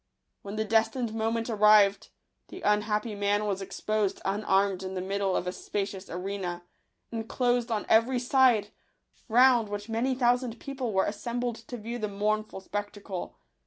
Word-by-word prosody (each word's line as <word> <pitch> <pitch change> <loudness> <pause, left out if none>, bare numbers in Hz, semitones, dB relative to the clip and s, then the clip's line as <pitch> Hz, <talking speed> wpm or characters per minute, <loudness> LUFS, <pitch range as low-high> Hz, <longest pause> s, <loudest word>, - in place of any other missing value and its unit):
When 200 +1 -7
the 220 0 -1
destined 225 +2 +1
moment 225 +1 -1
arrived, 210 -3 +4 0.4
the 370 - -10
unhappy 210 +1 +1
man 205 +1 0
was 200 -2 -2
exposed 205 +1 -1
unarmed 195 -1 +1
in 190 0 -5
the - - -2
middle 195 0 -1
of - - -1
a 180 - -1
spacious 195 0 -4
arena, 180 -1 -4 0.5
enclosed 240 +1 0
on 220 -2 -1
every 230 +4 +4
side, 245 -4 +3 0.6
round 240 -1 +5
which 205 +1 -5
many 240 +4 0
thousand 245 -2 +1
people 265 -4 -4
were 190 -1 +2
assembled 235 +3 -3
to 245 - -6
view 235 +2 -5
the 215 - -1
mournful 210 0 -2
spectacle. 205 -1 -5
215 Hz, 150 wpm, -28 LUFS, 200-235 Hz, 0.6 s, round